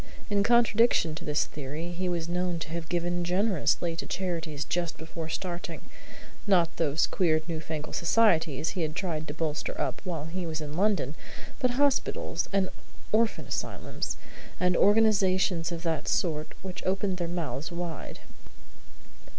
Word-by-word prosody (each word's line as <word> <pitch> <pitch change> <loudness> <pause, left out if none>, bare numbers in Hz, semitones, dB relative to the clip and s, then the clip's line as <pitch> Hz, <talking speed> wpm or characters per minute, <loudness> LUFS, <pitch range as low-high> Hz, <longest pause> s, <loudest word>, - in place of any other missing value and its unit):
In 200 -1 +4
contradiction 230 -5 +4
to 165 +3 -7
this 150 0 +1
theory 150 +4 -5
he 180 +1 -2
was 170 -2 -1
known 180 0 0
to 155 -2 -5
have 165 0 -4
given 175 0 0
generously 175 -3 +1
to - - -4
charities 165 -5 -2
just 175 -2 -1
before 160 0 -6
starting; 175 +1 -4 0.7
not 175 -4 +3
those 155 -1 +2
queer, 160 -4 +2
new 165 -2 -2
fangled 155 -1 -5
societies 165 -6 +3
he 185 - -3
had 155 -1 -1
tried 165 -5 -2
to 145 - -4
bolster 160 -2 -2
up - - -1
while 165 -6 -3
he 175 +2 -4
was 160 -1 -3
in 150 -1 -5
London, 190 -7 +2 0.5
but 250 -1 +1
hospitals 285 -1 +1
and 195 -2 +1 0.4
orphan 220 +1 +2
asylums, - - -3 0.4
and 180 -1 +3
organizations 195 -5 +4
of 170 0 -4
that 160 -4 -1
sort 155 -3 0
which 185 -2 -6
opened 190 0 0
their 175 -1 -1
mouths 160 -5 -3
wide. 170 -3 -5
170 Hz, 150 wpm, -29 LUFS, 160-185 Hz, 0.7 s, In